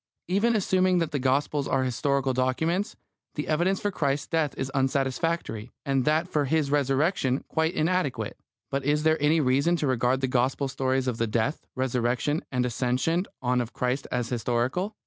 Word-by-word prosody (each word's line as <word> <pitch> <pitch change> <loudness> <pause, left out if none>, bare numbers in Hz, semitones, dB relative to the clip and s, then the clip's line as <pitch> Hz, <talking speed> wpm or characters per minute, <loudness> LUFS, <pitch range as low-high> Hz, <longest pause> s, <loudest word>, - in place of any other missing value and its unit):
Even 205 +6 +2
assuming 185 -2 +2
that 165 -2 0
the 145 - -1
Gospels 140 +2 +1
are 130 - +1
historical 135 +1 0
documents, 160 +10 0 0.4
the 150 - -3
evidence 175 +5 +1
for 205 - -1
Christ's 145 -5 -1
death 160 -3 0
is 135 0 -3
unsatisfactory, 135 -2 -1 0.2
and 135 -2 +1
that 155 +3 +2
for 150 -5 0
His 145 0 +1
Resurrection 140 0 +1
quite 160 +2 0
inadequate. 150 - -1 0.3
But 140 0 -1
is 150 +2 +1
there 160 -1 +2
any 155 +2 +4
reason 140 +5 +2
to 160 - -1
regard 130 0 +1
the 130 - +1
Gospel 130 +2 +1
stories 130 -1 -1
of 120 -2 -2
the 115 - +1
death, 115 +7 -1
Resurrection, 130 +3 0
and 125 -1 +1
Ascension 130 - 0 0.2
on 125 0 +2
of 120 0 -6
Christ 125 +2 -1
as 125 -2 -1
historical? 125 - -1
140 Hz, 170 wpm, -26 LUFS, 130-160 Hz, 0.4 s, any